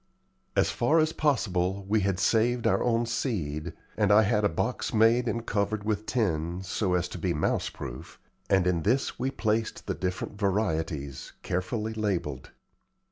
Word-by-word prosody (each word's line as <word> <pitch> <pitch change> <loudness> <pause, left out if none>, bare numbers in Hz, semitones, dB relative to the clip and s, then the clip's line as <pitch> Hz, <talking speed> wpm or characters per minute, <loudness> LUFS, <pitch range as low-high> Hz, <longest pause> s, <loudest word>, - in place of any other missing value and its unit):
As - - +3
far 145 +7 +2
as 155 0 +3
possible 100 - 0
we 110 +2 +3
had 95 -2 0
saved 115 +4 +2
our - - +3
own 120 -1 +2
seed, 85 - -2 0.2
and 105 -2 +2
I 105 +2 +7
had 105 - +1
had 105 - +1
a - - +4
box 80 - -2
made 115 +3 +4
and 115 0 -2
covered 105 0 -1
with 105 0 -2
tin, 90 -6 -1
so 95 0 0
as 90 0 0
to 90 - -7
be 85 0 0
mouse 75 - 0
proof, - - -9 0.3
and 95 -2 +4
in 90 -2 +1
this 125 - 0
we 130 +2 0
placed 110 -3 -1
the - - -1
different 95 +3 -4
varieties, 80 - -1
carefully 110 +5 -2
labelled. 90 -11 -2
100 Hz, 170 wpm, -28 LUFS, 90-115 Hz, 0.3 s, I